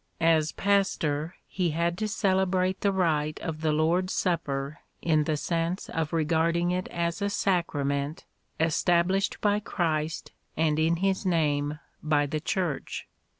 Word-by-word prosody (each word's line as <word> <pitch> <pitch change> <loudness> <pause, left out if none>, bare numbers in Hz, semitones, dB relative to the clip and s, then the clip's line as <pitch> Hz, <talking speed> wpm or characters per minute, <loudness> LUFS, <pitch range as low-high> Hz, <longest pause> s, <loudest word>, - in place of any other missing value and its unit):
As 160 -2 +3
pastor 170 -5 0
he 180 -3 -1
had 170 0 +1
to 215 - 0
celebrate 190 -2 +1
the 200 - +3
rite 155 -5 0
of 155 -2 -4
the 155 -1 +2
Lord's 165 +4 +1
Supper 145 -5 -1 0.2
in 155 -2 +2
the 155 -1 0
sense 170 +4 -2
of 160 -2 -2
regarding 165 +2 +1
it 185 +1 -1
as 170 +2 -2
a 200 - +1
sacrament 150 -7 -1 0.3
established 175 +4 +2
by 205 0 +3
Christ 160 -5 -2 0.3
and 155 -1 +2
in 160 +2 +3
His 195 +1 +1
name 150 -5 +1 0.2
by 150 -1 +2
the 155 +2 -2
Church. 165 -2 -2
165 Hz, 140 wpm, -27 LUFS, 155-185 Hz, 0.3 s, As